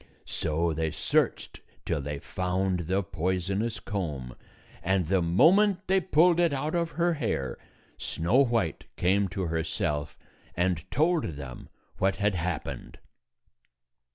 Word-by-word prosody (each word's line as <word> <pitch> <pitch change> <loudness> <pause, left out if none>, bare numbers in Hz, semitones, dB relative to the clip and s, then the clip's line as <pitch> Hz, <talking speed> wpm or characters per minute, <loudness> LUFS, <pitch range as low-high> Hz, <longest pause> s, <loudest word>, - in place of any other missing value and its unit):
So 80 +1 -1
they 80 +1 -1
searched - - 0 0.2
till 80 -4 -1
they 75 +1 -4
found 90 +1 -1
the 95 +2 +1
poisonous 95 +6 -1
comb, 75 - -4 0.5
and 95 -1 +1
the 95 +3 +2
moment 185 - +4
they 190 +1 +3
pulled 175 0 +4
it 170 -4 +3
out 150 +3 -2
of 170 -1 0
her 175 0 +3
hair, 110 - -2 0.4
Snow 115 +12 +2
White 115 - -1
came 100 +3 +2
to 95 +1 -4
herself 80 -3 -2 0.4
and 90 -1 0
told 155 +7 +2
them 65 -3 -9 0.3
what 95 0 +2
had 105 0 +1
happened. 85 -8 -4
95 Hz, 125 wpm, -28 LUFS, 80-135 Hz, 0.5 s, moment